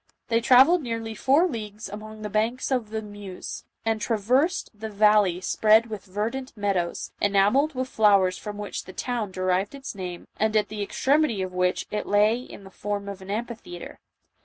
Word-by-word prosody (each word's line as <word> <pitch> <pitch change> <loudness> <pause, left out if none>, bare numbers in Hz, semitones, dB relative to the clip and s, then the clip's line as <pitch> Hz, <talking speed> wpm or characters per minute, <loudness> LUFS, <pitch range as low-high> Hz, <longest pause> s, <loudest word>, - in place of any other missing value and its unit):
They 230 0 +2
travelled 265 +9 +6
nearly 230 -3 -4
four 280 - +3
leagues 215 - -6
along 215 +2 -9
the 210 - -3
banks 225 +6 0
of 245 -5 0
the 220 0 -4
Meuse, 205 -3 -8 0.2
and 225 -1 0
traversed 250 - +1
the 220 +1 -7
valley 205 -3 +4
spread 220 +4 +3
with 210 -2 -6
verdant 220 +7 -4
meadows, 195 -4 -1
enamelled 205 +10 +3
with 255 0 -2
flowers 200 -6 +4
from 210 +1 -7
which 210 0 -5
the 185 - -10
town 235 -1 -2
derived 185 +4 0
its 270 -1 -7
name, 180 -3 -7
and 220 0 +2
at 210 - +1
the 215 0 -5
extremity 265 0 +1
of 185 -1 -5
which 180 0 0
it 210 - -3
lay 210 +3 +3
in 250 -5 -11
the 195 - -13
form 205 +1 -4
of 200 -1 -7
an 190 - -11
amphitheatre. 220 -5 -6
215 Hz, 180 wpm, -25 LUFS, 200-235 Hz, 0.2 s, travelled